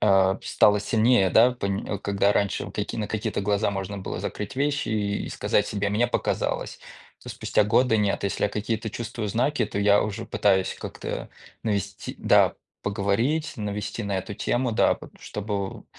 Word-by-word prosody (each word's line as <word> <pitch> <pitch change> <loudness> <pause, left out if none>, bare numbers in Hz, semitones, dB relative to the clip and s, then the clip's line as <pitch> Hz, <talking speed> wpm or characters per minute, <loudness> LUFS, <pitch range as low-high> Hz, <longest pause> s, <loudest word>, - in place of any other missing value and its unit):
а, 95 -2 +4
п - - -11
стало 105 0 +4
сильнее, 110 -2 +3
да, 120 +7 +6
пынь 100 -5 -3
э, 100 - -2
когда 100 0 +1
раньше 100 -4 0
каки - - -4
на 110 - -2
какие-то 110 -1 -2
глаза 100 +1 +1
можно 100 0 -4
было 95 - -5
закрыть 105 +5 -5
вещи 140 +1 0
и 105 -2 -1
сказать - - +1
себе: 100 -1 -1
"Мне 105 +4 +2
показалось". 120 - -2 0.4
То - - -10
спустя - - +1
годы 110 +2 +3
нет, 105 -2 +1
если 100 - 0
я - - +2
какие-то 110 +1 -2
чувствую 115 -1 -4
знаки, 120 +5 +1
то 100 - -4
я 100 0 +5
уже 110 +2 -4
пытаюсь 95 -2 +2
как-то - - -5 0.3
навести, 100 -2 -3
да, - - +4 0.3
поговорить, 110 +11 0
навести 105 +1 -4
на 100 -2 -1
эту 100 +2 -6
тему, 120 +2 0
да, - - +4
потому - - -14
чтобы 100 -2 -4
105 Hz, 175 wpm, -25 LUFS, 100-115 Hz, 0.4 s, да